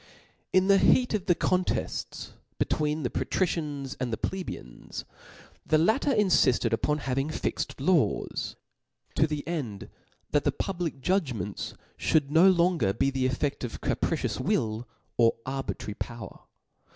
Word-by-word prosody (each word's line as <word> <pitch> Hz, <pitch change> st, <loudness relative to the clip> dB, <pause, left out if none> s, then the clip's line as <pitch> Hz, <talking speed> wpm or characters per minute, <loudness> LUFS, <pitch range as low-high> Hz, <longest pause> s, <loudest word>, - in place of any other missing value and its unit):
Book 185 Hz, -, +5 dB
¥ -, -, -1 dB
N 195 Hz, -, +6 dB
|hc -, -, +6 dB
heat 250 Hz, -2 st, 0 dB
of 200 Hz, -3 st, -1 dB
the 175 Hz, -, +5 dB
contefts 185 Hz, +1 st, -1 dB, 0.3 s
between 150 Hz, 0 st, 0 dB
the 125 Hz, -, -1 dB
patrici^ 185 Hz, -3 st, 0 dB
Cbap/j5. -, -, -4 dB, 0.3 s
ans 135 Hz, -, -6 dB
and 125 Hz, -2 st, -2 dB
the 110 Hz, -, -1 dB
plebeians, 180 Hz, -, -5 dB, 0.6 s
the 155 Hz, -, +3 dB
latter 220 Hz, -, +3 dB
infifted 180 Hz, -, +3 dB
upon 150 Hz, +6 st, +1 dB
having 135 Hz, +2 st, 0 dB
fixt 155 Hz, -, -3 dB
laws,' 160 Hz, +2 st, +1 dB, 0.6 s
to 155 Hz, -, +3 dB
the 150 Hz, -1 st, -4 dB
end 130 Hz, -, -4 dB, 0.4 s
that 145 Hz, -1 st, +3 dB
the 145 Hz, -, +2 dB
public 170 Hz, -2 st, -3 dB
judg 175 Hz, -6 st, +1 dB
ments 100 Hz, 0 st, -5 dB, 0.2 s
(hould 145 Hz, -3 st, +2 dB
no 165 Hz, +5 st, +7 dB
longer 170 Hz, -, +3 dB
be 135 Hz, +5 st, +1 dB
the 130 Hz, -1 st, +1 dB
effed 140 Hz, +2 st, -2 dB
of 120 Hz, -, -5 dB
capricious -, -, -1 dB
will 110 Hz, +2 st, 0 dB, 0.3 s
or 115 Hz, -1 st, +5 dB
arbitrary 135 Hz, -5 st, -4 dB
power. 115 Hz, +2 st, -7 dB
150 Hz, 150 wpm, -28 LUFS, 125-180 Hz, 0.6 s, no